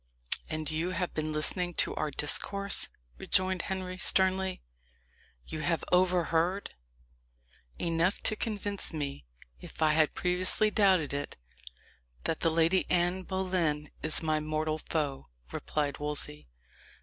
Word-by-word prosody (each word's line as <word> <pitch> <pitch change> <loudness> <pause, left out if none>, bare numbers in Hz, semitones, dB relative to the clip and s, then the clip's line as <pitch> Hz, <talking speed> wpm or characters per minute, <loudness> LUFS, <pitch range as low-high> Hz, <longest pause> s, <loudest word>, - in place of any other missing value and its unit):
"And 155 -1 -2
you 160 +3 -1
have 180 0 -2
been 155 0 -2
listening 175 +3 0
to - - +1
our 155 - -1
discourse?" 200 +8 +3 0.3
rejoined 185 0 +1
Henry 185 -1 -4
sternly. 190 0 +2 0.8
"You 155 - -6
have 165 +2 0
overheard 180 0 +2 0.5
" - - -38 0.3
"Enough 170 +3 +1
to 215 - +4
convince 205 -3 -2
me, 140 - -5 0.3
if - - -12
I 155 - +5
had 155 -1 +2
previously 185 +4 +2
doubted 190 -9 +3
it, 145 0 -4 0.9
that 160 - 0
the 165 - +2
Lady 165 +3 +2
Anne 180 +1 +1
Boleyn 180 -6 -1
is 155 +1 +1
my 155 -1 +1
mortal 155 0 -2
foe," 145 -4 -3 0.2
replied 145 -2 -2
Wolsey. 145 - -2
165 Hz, 125 wpm, -30 LUFS, 155-185 Hz, 0.9 s, I